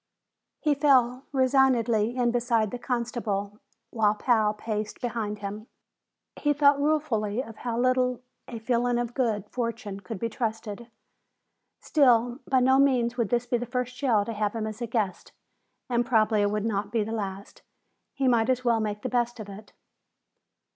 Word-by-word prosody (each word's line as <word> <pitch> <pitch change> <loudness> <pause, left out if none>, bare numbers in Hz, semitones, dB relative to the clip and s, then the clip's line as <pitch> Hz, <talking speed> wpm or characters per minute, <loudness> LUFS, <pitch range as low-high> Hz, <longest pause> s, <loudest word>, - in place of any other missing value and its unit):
He 300 -2 +3
fell 265 -3 +3
resignedly 255 -4 +2
in 240 -1 +2
beside 235 -3 +1
the 245 - -5
constable 230 -5 -3 0.3
while 215 -2 +2
Pal 220 -2 +2
paced 215 0 -4
behind 225 -4 -3
him. 210 +3 -6 0.7
He 295 -1 +1
thought 285 -1 +4
ruefully 255 -7 0
of 225 -3 -11
how 235 -2 -3
little 255 0 +1 0.3
a 235 - -6
feeling 240 +1 0
of 240 0 -2
good 220 -6 -1
fortune 230 -5 -4
could 220 +1 -7
be 230 - -2
trusted. 225 -1 -4 0.9
Still, 245 -4 +3
by 260 -1 +3
no 265 +1 +4
means 250 -4 +2
would 235 -5 -1
this 240 0 +1
be 245 -1 0
the 245 - -5
first 250 0 -3
jail 235 -7 +1
to 230 - -4
have 210 0 -2
him 220 -1 -2
as 215 +2 -6
guest, 215 -5 -2 0.5
and 240 -1 +1
probably 220 -3 +2
it 205 - +2
would 210 +1 -2
not 205 -2 -2
be 225 -3 +1
the 220 - -5
last. 200 -3 -5 0.5
He 275 -2 0
might 235 -1 +3
as 255 -1 0
well 235 -2 +3
make 210 -1 -3
the - - -1
best 240 -1 -1
of 210 -2 -7
it. 205 +2 -11
235 Hz, 170 wpm, -27 LUFS, 215-250 Hz, 0.9 s, thought